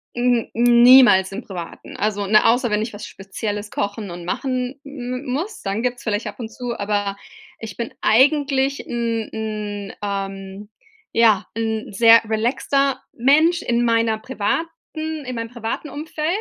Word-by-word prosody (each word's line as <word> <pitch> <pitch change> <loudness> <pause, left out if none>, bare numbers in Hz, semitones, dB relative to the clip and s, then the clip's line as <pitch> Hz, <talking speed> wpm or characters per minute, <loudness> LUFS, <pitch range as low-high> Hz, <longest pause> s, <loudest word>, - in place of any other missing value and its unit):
N 240 -1 +1
niemals 240 -4 +6
im 205 +5 -5
Privaten. 175 -4 -8
Also, 205 -1 -1
ne, 215 +2 +5
außer 240 +1 +3
wenn 210 0 +1
ich 225 - -6
was 205 +1 -8
Spezielles 205 +1 -5
kochen 200 -1 -3
und 175 0 -8
machen 255 +6 -3
m 255 -3 -6
m - - -14
muss, 370 +10 -4
dann 200 +3 -2
gibt's 245 0 -2
vielleicht 210 -1 -2
ab - - -8
und 225 -2 -5
zu, 240 +1 -5
aber 200 -1 -1 0.4
ich 220 -4 -8
bin 235 -1 -4
eigentlich 275 +2 +2
'n 230 -2 -2
'n, 210 -2 -5
ähm 195 0 -5 0.4
ja, 220 -4 +4
'n 220 -1 -2
sehr 230 +2 +7
relaxter 265 +5 0
Mensch 310 +8 +3
in 240 0 +1
meiner 230 -1 +2
privaten 260 +7 -2 0.6
in 255 - -4
meinem 230 0 -4
privaten 235 +5 -5
Umfeld. 305 +1 -4
230 Hz, 155 wpm, -21 LUFS, 205-250 Hz, 0.6 s, sehr